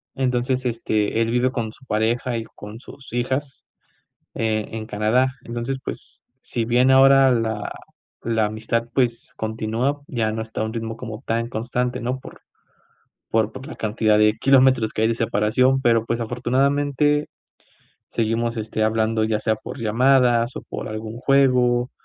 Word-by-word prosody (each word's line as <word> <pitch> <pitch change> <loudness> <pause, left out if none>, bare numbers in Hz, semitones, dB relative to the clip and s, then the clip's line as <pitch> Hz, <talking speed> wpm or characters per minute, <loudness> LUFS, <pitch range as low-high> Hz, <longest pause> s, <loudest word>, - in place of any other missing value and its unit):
entonces, 130 0 0
este, 110 -2 0
él 115 - +1
vive 125 +1 +2
con 115 -4 -3
su 130 - -20
pareja 115 +2 0
y 115 - -3
con 105 +2 -9
sus 135 -3 -13
hijas, 130 +3 -3 0.7
eh, 110 -2 -1
en 110 -1 -5
Canadá. 120 +6 +1
Entonces, 120 +3 -3
pues, - - -8 0.2
si 115 - -3
bien 125 +3 +3
ahora 135 0 +6
la 110 -3 -1 0.5
la 115 -2 +1
amistad, 110 +2 -1
pues, 120 -3 -1
continúa, 115 +6 -2
ya 110 -4 -1
no 110 0 -3
está 110 0 -5
a - - +1
un 110 - -5
ritmo 115 -1 -4
como 110 -1 -7
tan 115 +1 -1
constante, 125 +2 -2
¿no? 125 +2 -2
Por - - -12 0.9
por 110 -1 +1
por 130 +4 -9
la - - -8
cantidad 110 0 +1
de 105 0 +5
kilómetros 130 -4 +4
que 110 - -2
hay - - +4
de 115 - 0
separación, 115 +4 +2
pero, 115 -2 +3
pues, 115 0 -1
afortunadamente, 140 +5 +1 0.8
seguimos, 115 +1 -1
este, 110 0 -2
hablando 110 0 +1
ya 110 -1 0
sea 110 - +1
por 110 - -9
llamadas, 120 +1 +3
o - - -5
por - - -6
algún 110 +1 -6
juego, 125 -3 +3
115 Hz, 160 wpm, -22 LUFS, 110-130 Hz, 0.9 s, ahora